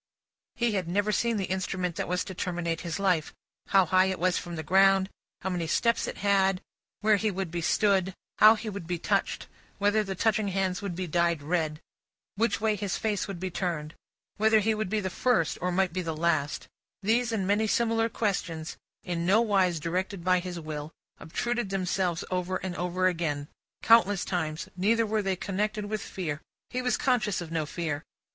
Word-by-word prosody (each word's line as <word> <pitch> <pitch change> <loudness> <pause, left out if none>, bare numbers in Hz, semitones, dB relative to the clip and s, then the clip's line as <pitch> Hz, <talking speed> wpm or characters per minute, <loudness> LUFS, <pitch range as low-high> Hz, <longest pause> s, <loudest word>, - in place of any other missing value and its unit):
He 240 -1 +1
had 190 -5 -1
never 205 +4 +1
seen 230 +1 +1
the 195 - -1
instrument 185 -2 -2
that - - -2
was 180 +1 0
to 190 - -7
terminate 170 -2 -2
his 170 0 -3
life. 180 -6 +1 0.3
How 195 -1 +5
high 185 +2 +4
it 190 -1 -1
was 180 +1 +1
from 175 -1 -4
the 160 - -4
ground, 195 +3 +4 0.3
how 190 - -2
many 175 -2 -2
steps 230 +8 +1
it - - -5
had, 195 -2 +2 0.4
where 215 -1 +4
he 215 +2 0
would 190 -3 -3
be 170 0 -2
stood, 190 +1 +2 0.2
how 215 +1 +9
he 225 - -7
would 200 -5 -5
be 175 0 -1
touched, - - -1 0.3
whether 205 +1 +2
the 195 -2 -4
touching 215 +1 +1
hands 190 -1 -1
would 195 -4 -4
be 185 +1 -3
dyed 170 -2 +1
red, 155 -1 -1 0.6
which 230 +3 +1
way 215 -1 +1
his 200 -2 -2
face 210 -3 -1
would 195 -4 -6
be 185 +1 -3
turned, 165 -4 -3 0.4
whether 220 +1 +4
he 220 +1 +2
would 215 -3 -2
be 215 +1 0
the 190 -1 -3
first, 220 -6 +1
or 180 +1 0
might 185 -1 +1
be 185 - -1
the 165 -3 -4
last: 155 -3 0 0.4
these 235 +3 +2
and 210 -4 -1
many 205 +3 +2
similar 225 0 +2
questions, 170 -8 -2 0.3
in 170 -1 -2
nowise 195 -5 +3
directed 180 +3 -2
by 185 0 +3
his 175 -1 -5
will, 155 -1 -6 0.3
obtruded 240 +5 -2
themselves 185 -2 -1
over 180 0 -1
and 180 -2 -3
over 180 +1 -1
again, 160 -5 0 0.4
countless 205 -4 +5
times. 160 -3 -2
Neither 225 +5 +2
were 215 0 0
they 195 -1 0
connected 205 +3 -2
with 210 0 -3
fear: 155 -5 -4 0.3
he 255 - -1
was 250 0 +1
conscious 220 -7 +1
of 170 -2 -7
no 160 -2 -1
fear. 155 -3 -3
190 Hz, 195 wpm, -28 LUFS, 170-210 Hz, 0.6 s, how